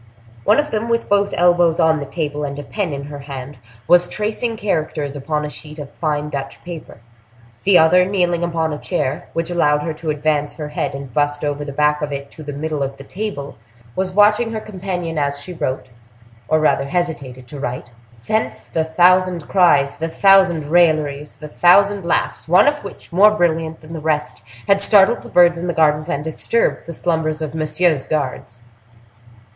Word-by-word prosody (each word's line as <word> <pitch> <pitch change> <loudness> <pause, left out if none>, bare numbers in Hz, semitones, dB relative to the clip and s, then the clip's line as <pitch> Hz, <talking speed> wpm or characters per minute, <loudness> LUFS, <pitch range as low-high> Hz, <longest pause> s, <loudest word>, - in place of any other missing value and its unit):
One - - +4
of 295 0 0
them, 220 +1 -2
with 230 0 0
both 200 0 +2
elbows 175 -1 +3
on 160 -1 +3
the 140 - -6
table, 150 -2 -3
and 140 -1 -4
a 145 - -6
pen 190 +3 -3
in 140 0 -5
her 145 0 -8
hand, 135 -1 -8 0.3
was 175 +1 +5
tracing 220 +2 -3
characters 155 -7 -2
upon 150 +2 -2
a - - -3
sheet 150 +1 -11
of 145 -2 -8
fine 150 -2 -2
Dutch 140 -1 -6
paper; 165 -9 -9 0.6
the 195 -2 +6
other, 180 +3 +5
kneeling 175 -3 0
upon 165 -2 -1
a 150 - -5
chair, 150 -6 -3
which 165 +1 -2
allowed 150 -4 +2
her 160 - -3
to 155 +1 -6
advance 150 -1 -1
her 150 -2 -6
head 150 - -3
and 135 -3 -8
bust 145 +1 0
over 145 0 -2
the 145 - -6
back 150 +1 +1
of 150 -1 -3
it 140 0 -6
to - - -12
the 145 -1 -6
middle 150 +1 -4
of 135 0 -3
the 135 - -10
table, 180 -5 -6 0.4
was 190 0 -1
watching 210 +3 +4
her 220 - -2
companion 180 -6 -4
as 140 0 -1
she 160 +6 -8
wrote, 130 -5 -4 0.6
or 155 - +2
rather 150 -3 +2
hesitated 140 -6 -4
to 145 - -8
write. 125 -3 -5 0.4
Thence 220 0 -1
the 160 - -2
thousand 180 +1 +2
cries, 145 -7 +3
the 165 +1 -3
thousand 175 -5 +3
railleries, 155 -4 +2
the 150 - -10
thousand 200 +5 +4
laughs, 170 - -1
one 180 - +5
of 295 0 +1
which, - - -11
more 200 +4 +7
brilliant 165 -5 -1
than 160 +1 -11
the 160 - -5
rest, 150 -4 -2 0.3
had 200 0 +3
startled 200 +2 +4
the - - -12
birds 175 -1 +4
in 175 - -4
the 175 - -1
gardens, 155 0 +2
and 145 -2 -2
disturbed 160 +8 0
the - - -5
slumbers 160 -2 -1
of 155 -2 -4
Monsieur's 155 -1 +1
guards. 130 -5 -4
160 Hz, 195 wpm, -19 LUFS, 145-180 Hz, 0.6 s, more